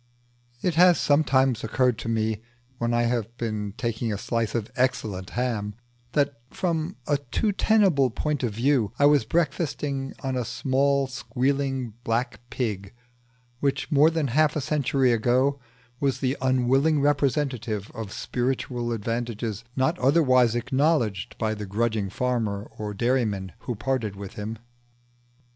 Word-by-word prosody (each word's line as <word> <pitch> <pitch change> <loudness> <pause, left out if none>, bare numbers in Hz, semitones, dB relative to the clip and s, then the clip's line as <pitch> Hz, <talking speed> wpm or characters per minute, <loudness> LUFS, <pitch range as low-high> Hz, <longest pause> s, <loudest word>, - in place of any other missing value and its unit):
It 180 - +2
has 175 +1 +6
sometimes 135 -5 +3
occurred 125 +1 +1
to - - -4
me 110 -1 0 0.4
when 120 0 0
I 120 0 +2
have 120 -1 -1
been 105 -3 -3
taking 115 -2 -2
a 105 - -2
slice 115 +2 -2
of 115 -2 -2
excellent 110 -7 -1
ham 110 -5 -1 0.4
that, 140 -3 +1
from 170 0 -2
a 145 - +2
too 145 - -1
tenable 190 - +3
point 150 +4 -2
of 120 -4 0
view, 115 -1 +1
I 140 - +4
was 145 -5 +5
breakfasting 140 -2 -1
on 135 -1 -1
a 125 - 0
small 140 +3 +1
squealing 130 0 -1
black 120 +2 -1
pig 105 -5 -3 0.6
which, 140 +2 -1
more 150 +2 +6
than 160 -4 -1
half 150 +4 +3
a 150 - 0
century 135 -3 +2
ago, 125 +5 +2 0.4
was 140 -2 0
the 130 0 0
unwilling 130 +4 +3
representative 135 -7 0
of 110 -4 -6
spiritual 125 -1 -2
advantages 115 -1 -3
not 135 +7 +1
otherwise 130 -4 +4
acknowledged 130 - 0
by 110 -1 0
the 105 -1 -6
grudging 110 0 0
farmer 110 -3 -1
or 105 -2 -5
dairyman 110 -5 0
who 120 - -4
parted 115 -3 -2
with 100 -1 -8
him. 110 +2 -5
125 Hz, 140 wpm, -25 LUFS, 110-140 Hz, 0.6 s, has